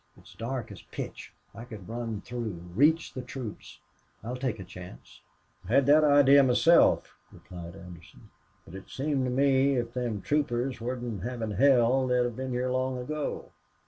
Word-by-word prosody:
It's - - -17
dark 120 -2 -5
as 100 - -10
pitch. - - -8 0.2
I 115 +3 -9
could 110 -6 -10
run 115 -2 -4
through 110 -8 -6
reach 155 - +3
the 130 - -5
troops. 125 -3 -8 0.5
I'll 120 +3 -4
take 125 -3 -2
a - - -6
chance." 90 -8 -12 0.5
"I - - -1
had 140 0 +5
that 150 +2 +6
idee 145 -1 +6
myself," 135 +6 +4 0.2
replied 85 -1 -10
Anderson. 90 -3 -14 0.3
"But - - -14
it 95 0 -10
seems 135 -1 -1
to - - -1
me 135 +1 +3
if 120 -1 -2
them 120 -6 -3
troopers 135 -4 -1
wasn't 120 -4 -4
havin' 115 -1 -4
hell 130 +1 +4
they'd 125 -2 +1
been 130 +1 -4
here 125 0 -1
long 130 0 -1
ago. 150 +4 -4
125 Hz, 165 wpm, -28 LUFS, 110-135 Hz, 0.5 s, that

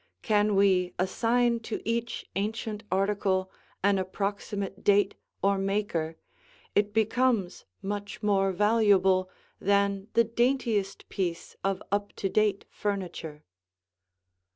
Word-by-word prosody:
Can 210 -2 +3
we 190 -2 +3
assign 235 +6 +2
to 225 -1 -4
each 235 +1 -2
ancient 215 +1 -3
article 190 -1 +1 0.3
an 200 -1 +4
approximate 200 +1 -3
date 200 -1 +4 0.3
or 200 0 +3
maker, 195 -5 -1 0.6
it 205 0 +2
becomes 220 -2 +1 0.2
much 205 +1 -5
more 195 -2 +3
valuable 195 -2 +3 0.3
than 200 0 +1
the 230 - +6
daintiest 230 -4 0
piece 175 -3 -3
of 195 -1 -1
up 205 0 -1
to 195 - -2
date 210 -1 +1
furniture. 180 -7 -4
200 Hz, 105 wpm, -28 LUFS, 190-215 Hz, 0.6 s, the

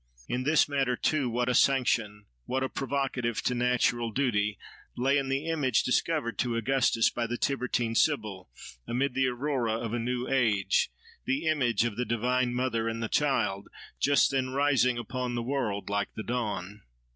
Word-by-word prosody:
In 125 - -1
this 155 +2 +4
matter 135 -3 0
too, 140 -1 0
what 120 +1 -1
a 125 - +2
sanction, 115 -6 +2 0.2
what 130 +1 -1
a 130 - -1
provocative 135 -4 -2
to 125 - +1
natural 120 -1 +1
duty, 105 -5 0 0.4
lay 135 +3 +2
in 135 -1 -3
that 135 - +1
image 145 -5 +1
discovered 125 -1 0
to 120 -2 0
Augustus 115 -1 +2
by 120 -1 -2
the 120 +1 -3
Tiburtine 125 -4 -1
Sibyl, 105 - 0 0.4
amid 130 +3 0
the 130 0 +2
aurora 125 -2 -1
of 115 0 -3
a 120 - 0
new 125 +1 -2
age, 105 -7 +2 0.4
the 140 +5 -1
image 130 -9 +2
of 115 -4 -3
the 125 - -1
Divine 125 +2 0
Mother 125 -3 0
and 115 0 -4
the 110 - -2
Child, 105 -9 0 0.3
just 140 0 +3
then 130 -1 0
rising 135 -2 +2
upon 125 +1 -3
the 120 - -2
world 120 -6 -2
like 100 0 -1
the 110 - -5
dawn! 105 -5 -3
125 Hz, 170 wpm, -28 LUFS, 115-135 Hz, 0.4 s, this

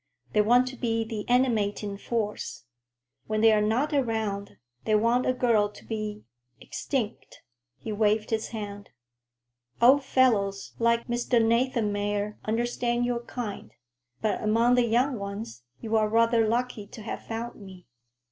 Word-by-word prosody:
They 210 - +5
want 245 +4 +4
to 260 - -9
be 230 -2 -1
the 220 -1 -6
animating 215 -5 +1
force. 210 - -4 0.6
When 215 0 0
they 225 0 +7
are 215 -1 +3
not 240 +9 +1
around, 220 - -1 0.3
they 215 - +2
want 230 +4 +2
a - - +4
girl 225 -5 +2
to 210 - -15
be—extinct," 210 - -5 0.3
he 220 - -6
waved 215 +1 +1
his 220 -1 0
hand. 205 -2 -7 0.9
"Old 265 +4 +6
fellows 220 -7 +1
like 235 0 +2
Mr. 240 0 +1
Nathanmeyer 210 -3 0
understand 240 +2 0
your 245 -1 0
kind; 215 - -6 0.5
but 215 - 0
among 230 +3 +3
the 245 -1 +4
young 245 +2 +1
ones, 200 - -7 0.2
you 225 0 -2
are 215 -1 +3
rather 230 0 +3
lucky 235 -2 -1
to 220 - -11
have - - -6
found 230 0 -5
me. 190 -2 -12
225 Hz, 140 wpm, -27 LUFS, 210-240 Hz, 0.9 s, they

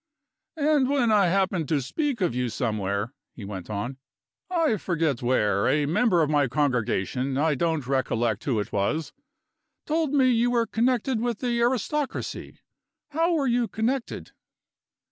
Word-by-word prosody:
"And 290 -3 +2
when 265 -5 +2
I 205 -3 +4
happened 185 -4 0
to 155 - +2
speak 245 - -2
of 175 -9 +1
you 125 0 -1
somewhere," 105 0 -2 0.2
he 105 - -8
went 95 -2 -7
on, 105 +6 -4 0.5
"I 330 -10 +1
forget 165 -8 -1
where 105 -5 +1
a 145 +3 +2
member 175 +2 +3
of 150 - 0
my 145 -2 +3
congregation 130 -1 0
I 155 +2 +2
don't 160 -1 -1
recollect 120 -5 0
who 125 -6 +1
it 105 - -4
was 145 +9 -1 0.7
told 315 -2 0
me 265 -3 +4
you 240 0 +2
were 235 -1 +2
connected 240 +1 0
with 240 -2 -1
the 240 -1 -1
aristocracy. 260 +4 -2 0.5
How 330 +3 +1
were 290 -3 +1
you 240 -2 +1
connected?" 235 +4 -3
165 Hz, 150 wpm, -25 LUFS, -, 0.7 s, I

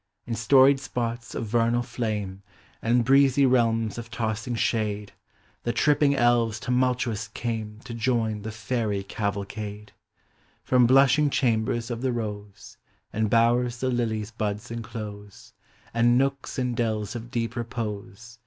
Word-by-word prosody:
In 120 - -4
storied 130 +5 +5
spots 120 -2 -4
of - - -2
vernal 120 +2 +1
tlame 105 -6 -3 0.4
And 120 +1 +2
breezy 135 +1 +5
realms 115 -3 +2
of 115 0 -8
tossing 115 0 -2
shade, 105 -3 -1 0.5
The 120 - -1
tripping 145 +2 +3
elves 120 -3 +2
tumultuous 125 -3 0
came 110 -1 -4
To 115 - -8
join 115 -2 0
the 110 +2 -5
fairy 110 -3 -2
cavalcade: 105 +1 -4 0.7
From 125 -2 +4
blushing 135 +3 +5
chambers 120 -2 0
of 120 0 -4
the 130 -1 0
rose, 105 -4 -6 0.4
And 110 0 0
bowers 120 +2 +3
the 130 +2 -1
lily's 110 -3 -1
buds 110 0 -3
enclose, 110 -3 -8 0.4
And 120 +1 +4
nooks 135 +1 -1
and 125 -2 -1
dells 110 -1 -1
of 120 0 -6
deep 115 0 -2
repose. 115 -1 -6
115 Hz, 135 wpm, -26 LUFS, 110-120 Hz, 0.7 s, storied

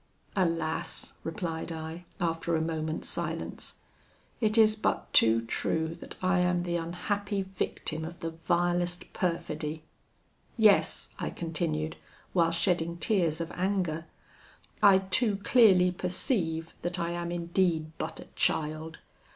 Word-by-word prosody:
'Alas!' 165 -3 0
replied 165 -1 -3
I, 160 +2 -6
after 165 -1 0
a - - +2
moment's 160 -1 -2
silence, - - -3 0.6
'it 215 -1 +2
is 215 -1 +6
but 215 - -1
too 115 0 +5
true 160 +7 -1
that - - -10
I 185 0 +3
am 180 0 +2
the 175 -1 -1
unhappy 195 +4 -2
victim 185 -4 -3
of 170 +2 -7
the 165 - -3
vilest 175 +2 0
perfidy. 160 -3 -2 0.7
Yes,' 215 -3 +4
I - - -2
continued, 160 -2 -2 0.4
while 170 -2 +4
shedding 170 0 +1
tears 170 -4 +1
of 165 -1 -4
anger, 180 -4 -1 0.7
'I 195 -2 +8 0.2
too 215 -3 +3
clearly 190 -8 +6
perceive 180 - -1
that 175 +1 -2
I 170 0 -1
am 170 0 -3
indeed 170 -2 0
but 160 +1 -4
a - - -9
child. 155 +1 0
170 Hz, 125 wpm, -29 LUFS, 160-185 Hz, 0.7 s, I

